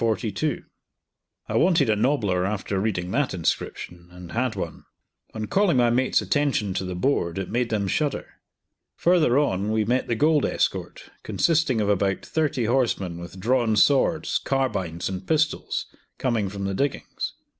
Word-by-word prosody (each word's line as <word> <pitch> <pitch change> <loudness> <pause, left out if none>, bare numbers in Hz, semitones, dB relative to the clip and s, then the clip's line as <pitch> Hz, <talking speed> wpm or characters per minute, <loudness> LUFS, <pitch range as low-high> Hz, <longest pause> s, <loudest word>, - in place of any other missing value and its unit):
I - - -3
wanted 170 -5 +4
a 110 - +3
nobbler 105 -6 +1
after 100 0 -2
reading 95 -4 -2
that 135 -5 0
inscription, 85 0 -3
and 90 -1 -11
had 120 -1 -1
one. 85 -5 -6 0.5
On 110 -1 -3
calling 195 - +2
my 120 -1 +4
mates' 130 +2 +2
attention 140 -9 0
to 95 - -2
the 90 0 -4
board, 90 -5 0
it 95 -2 -4
made 120 0 0
them 105 -3 -1
shudder. 150 +7 -1 0.7
Further 165 -7 +3
on 105 -8 +1
we 110 -1 +1
met 125 +4 0
the 115 - 0
gold 150 +4 +3
escort, - - -2
consisting 155 -7 +1
of 105 - 0
about 100 -1 0
thirty 150 -6 0
horsemen 110 -8 0
with 85 +2 -9
drawn 115 +1 +2
swords, 145 +8 +3
carbines, 95 -11 -1
and 95 0 -5
pistols, 155 0 0 0.3
coming 115 -6 0
from 100 0 -5
the 95 - -1
diggings. 140 +8 -3
110 Hz, 155 wpm, -24 LUFS, 95-140 Hz, 0.7 s, wanted